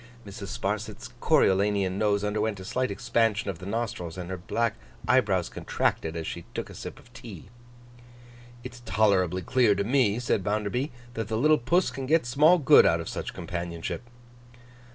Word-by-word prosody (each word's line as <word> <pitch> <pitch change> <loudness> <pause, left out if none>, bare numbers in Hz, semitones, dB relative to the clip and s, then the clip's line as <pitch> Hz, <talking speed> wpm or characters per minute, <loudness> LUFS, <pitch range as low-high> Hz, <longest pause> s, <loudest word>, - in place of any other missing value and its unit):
Mrs. 100 0 -8
Sparsit's 105 +3 -3
Coriolanian 100 -8 +2
nose 105 -1 +1
underwent 105 0 -1
a 95 - -8
slight 130 +5 -1
expansion 110 -1 0
of 85 - -12
the 90 - -8
nostrils, 105 -6 -3
and 90 0 -6
her 95 - -3
black 115 +5 -1 0.3
eyebrows 100 -9 +2
contracted 80 0 -2
as 80 -1 -4
she 85 - -5
took - - -4
a - - -10
sip - - -8
of 120 - -19
tea. 110 -7 -11 1.1
'It's 125 -1 -9
tolerably 95 -4 +2
clear 125 -5 +3
to 100 - 0
me,' 115 -2 +2
said 120 -5 0
Bounderby, 105 +6 -1 0.2
'that 115 -3 -4
the 110 0 -2
little 155 +5 +4
puss 170 +10 +1
can 135 -1 -6
get 160 -1 +3
small 150 +8 +5
good 150 -2 +7
out 85 - +2
of 85 - -6
such - - -5
companionship. 85 0 -5
105 Hz, 170 wpm, -27 LUFS, 95-120 Hz, 1.1 s, good